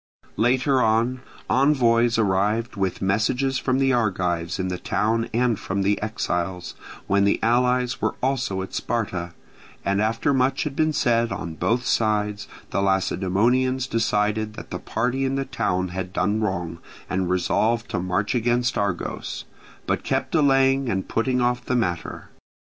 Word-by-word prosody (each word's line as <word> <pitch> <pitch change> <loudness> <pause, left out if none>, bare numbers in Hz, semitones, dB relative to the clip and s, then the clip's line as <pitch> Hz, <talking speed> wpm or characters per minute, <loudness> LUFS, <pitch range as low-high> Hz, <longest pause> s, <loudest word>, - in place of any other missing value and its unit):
Later 130 +3 +3
on, 115 +3 +1 0.3
envoys 120 -4 +3
arrived 105 +3 +1
with 95 -1 -2
messages 125 +7 +1
from 130 -1 0
the 135 0 +2
Argives 90 -7 0
in 95 - -2
the 90 -1 -3
town 115 +2 0
and 120 -2 +1
from 100 +1 -2
the 100 +1 +1
exiles, 90 -4 -2 0.3
when 100 0 +2
the 100 - +2
allies 125 +1 +2
were - - 0
also 125 -8 -1
at 95 - -9
Sparta; 95 -7 -3 0.5
and 100 +1 +1
after 115 +6 +1
much 130 +1 +1
had 150 -3 -4
been 155 +1 +2
said 120 -6 +1
on 90 -4 -4
both 120 +9 0
sides, 105 -2 0 0.2
the 100 - 0
Lacedaemonians 105 +7 +1
decided 110 -2 0
that - - -10
the - - -3
party 125 +4 -1
in 135 0 0
the 135 0 -1
town 95 -8 -1
had 90 +1 -5
done 105 +3 0
wrong, 90 -5 -2 0.3
and 95 -1 -1
resolved 110 +5 +1
to - - -1
march 95 +5 -1
against 120 0 +1
Argos, 100 -4 -3 0.4
but - - 0
kept - - -1
delaying 135 -3 +3
and 95 -3 -2
putting 125 +2 +1
off 120 0 +1
the 125 - -1
matter. 90 -8 -2
110 Hz, 155 wpm, -24 LUFS, 95-125 Hz, 0.5 s, Later